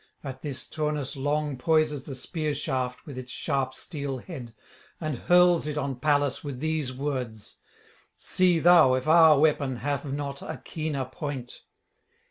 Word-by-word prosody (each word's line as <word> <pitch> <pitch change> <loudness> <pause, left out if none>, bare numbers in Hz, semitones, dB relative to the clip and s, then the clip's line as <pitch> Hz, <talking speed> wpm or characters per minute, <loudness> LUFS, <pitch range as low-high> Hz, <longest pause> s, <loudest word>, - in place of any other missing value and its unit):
At 135 -2 -7
this 140 -3 -3
Turnus 150 -3 -2
long 145 0 -1
poises 155 -2 +1
the 135 - -6
spear 155 +2 -3
shaft 130 -3 -3
with 140 -4 -7
its 125 -1 -9
sharp 130 -1 -1
steel 140 -4 -4
head, 125 -5 -9 0.4
and 155 -6 -3
hurls 175 -3 +4
it 150 0 -3
on 135 -3 -2
Pallas 145 -1 +1
with 140 -4 -5
these 155 -3 -1
words: 130 -5 -4 0.6
_See 180 -2 +2
thou 165 -7 +7
if 130 +3 -3
our 160 -1 +7
weapon 145 -3 +2
have 140 +2 -3
not 140 0 -4
a - - -6
keener 155 -4 -4
point. 130 -1 -6
145 Hz, 150 wpm, -27 LUFS, 130-155 Hz, 0.6 s, thou